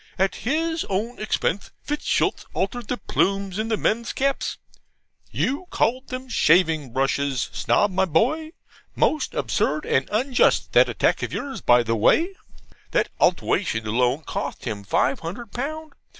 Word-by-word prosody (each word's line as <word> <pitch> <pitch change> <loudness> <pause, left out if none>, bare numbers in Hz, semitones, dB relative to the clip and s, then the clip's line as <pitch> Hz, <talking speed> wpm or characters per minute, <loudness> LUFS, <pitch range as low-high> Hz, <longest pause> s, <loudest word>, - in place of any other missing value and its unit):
At 190 +1 +1
his 320 +6 -1
own 215 +6 -2
expense 205 -2 -1 0.2
Fitzstultz 295 0 0
altered 220 +4 -2
the 250 - -2
plumes 195 -2 0
in 220 - -1
the 220 -1 0
men's 230 +3 0
caps 275 +1 -1 0.7
(you 290 +8 -2
called 255 +3 0
them 255 0 -6
shaving 160 - +3
brushes, 135 +1 0
Snob, 205 - +2
my 190 +1 +2
boy: 260 - +1 0.5
most 305 -3 +1
absurd 150 0 0
and 135 - +1
unjust 245 +4 +2
that - - +6
attack - - +1
of - - -3
yours, 275 -1 -5
by 120 0 +5
the 115 0 0
way); 330 - +3 0.6
that - - +1
altewation 115 - +1
alone 125 +7 +1
cotht 140 0 -5
him 105 -4 -4
five 130 +6 +1
hundred 200 +7 -7
pound. 310 +5 -5
205 Hz, 145 wpm, -23 LUFS, -, 0.7 s, that